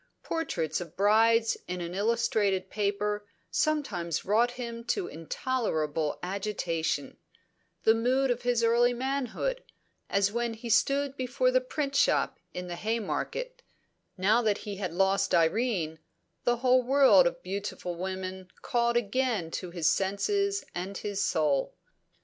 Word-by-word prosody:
Portraits 180 - -2
of 170 -2 -9
brides 225 +3 +4
in 180 0 -3
an 170 0 -5
illustrated 205 -2 +1
paper 205 0 -1 0.3
sometimes 205 - -1
wrought 220 +5 +3
him 235 -2 -6
to 380 - 0
intolerable 160 - -2
agitation 180 -4 -2 0.7
the 220 - +6
mood 255 +3 +2
of 245 0 -1
his 245 -1 +1
early 240 +1 +4
manhood, 275 - -2 0.5
as 200 0 +2
when 235 0 -1
he 230 +1 -5
stood 275 +4 +2
before 270 - +1
the - - +3
print 300 - -3
shop - - +2
in 180 - -5
the 175 -1 -5
Haymarket; 235 - -3 0.6
now 210 +6 +3
that 215 -3 +1
he 205 -2 -6
had 185 -4 -3
lost 195 +2 +2
Irene, 165 -2 +1 0.5
the 240 0 +3
whole 255 +1 +4
world 275 - +6
of - - -4
beautiful 195 -3 -4
women 185 +1 -5
called 235 0 +1
again 225 -6 0
to 180 - -4
his 170 -2 -1
senses 395 - +1
and 190 +3 -4
his 200 -1 -2
soul. 150 -4 +1
220 Hz, 135 wpm, -29 LUFS, 185-250 Hz, 0.7 s, the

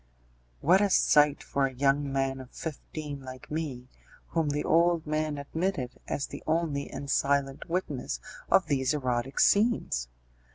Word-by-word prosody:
What 185 +5 +5
a 205 - +3
sight 150 -5 +4
for 140 -1 +1
a 130 - -8
young 140 +2 +1
man 135 0 0
of 130 -1 -10
fifteen 150 -2 -6
like 130 +1 -10
me, 145 -6 -4 0.4
whom 160 -3 0
the 145 +1 -1
old 170 0 +3
man 155 -1 -1
admitted 145 -2 -3
as 140 - -1
the - - -8
only 155 -3 0
and 140 +1 -6
silent 140 +1 0
witness 165 -7 -2 0.3
of 190 - +5
these 140 -1 +1
erotic 130 -1 -1
scenes! 205 - +3
145 Hz, 150 wpm, -29 LUFS, 135-160 Hz, 0.4 s, What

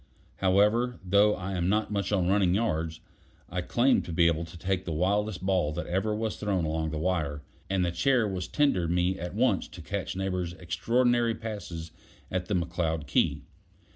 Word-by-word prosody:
However, 105 +6 +2
though 100 +3 +4
I 95 +1 -5
am 90 -1 0
not 105 +1 +1
much 100 -2 -1
on 95 -4 +2
running 95 -2 +3
yards, 80 -7 -1 0.5
I 90 - -1
claim 120 +9 +3
to - - -7
be 85 +1 +3
able 85 0 +2
to 80 +2 -11
take 95 +1 -1
the 85 - -5
wildest 95 +3 0
ball 90 -6 +2
that 85 - -4
ever 100 +4 0
was 110 0 -2
thrown 95 -5 0
along 80 0 -1
the 80 - -4
wire, 75 -4 -1 0.3
and 95 -2 +1
the 85 - 0
chair 125 +3 +2
was 95 -3 -3
tendered 115 - +1
me 90 +2 +1
at 90 +1 -5
once - - +2
to - - -12
catch - - -4
Neighbor's 90 -2 -2
extraordinary 115 +8 +1
passes 90 -8 -6 0.4
at 90 0 -2
the 100 - 0
McCloud 85 -3 -1
key. 70 - +1
95 Hz, 185 wpm, -28 LUFS, 85-105 Hz, 0.5 s, though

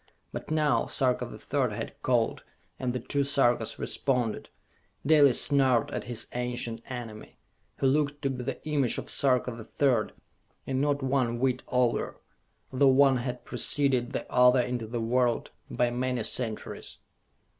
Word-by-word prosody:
But - - -6
now 155 -1 +2
Sarka 130 -2 0
the - - -10
Third - - -1
had - - -6
called, - - +1 0.4
and 125 -1 -1
the 125 - -3
two 140 +4 -1
Sarkas 135 -4 +1
responded. 125 -5 -1 0.6
Dalis 145 -4 +5
snarled 135 -5 +2
at - - -4
his 120 -2 -3
ancient 120 -2 -3
enemy, 115 -4 -8 0.4
who - - -1
looked 145 +1 +1
to 135 - +1
be 125 -1 -5
the - - -5
image 140 -5 +1
of - - -3
Sarka 125 -2 +2
the 115 -1 -8
Third 120 -1 +1 0.5
and 130 0 -1
not 145 -1 0
one 130 -3 +1
whit 130 0 0
older, 125 -2 0 0.6
though 135 +2 +4
one 135 0 +5
had 125 0 -5
preceded 130 0 0
the - - -3
other 125 0 +5
into 120 -2 -3
the 120 +2 -3
world 120 +1 +1 0.2
by 120 -1 0
many 125 -1 -1
centuries. 110 -1 -4
125 Hz, 155 wpm, -28 LUFS, 120-135 Hz, 0.6 s, Dalis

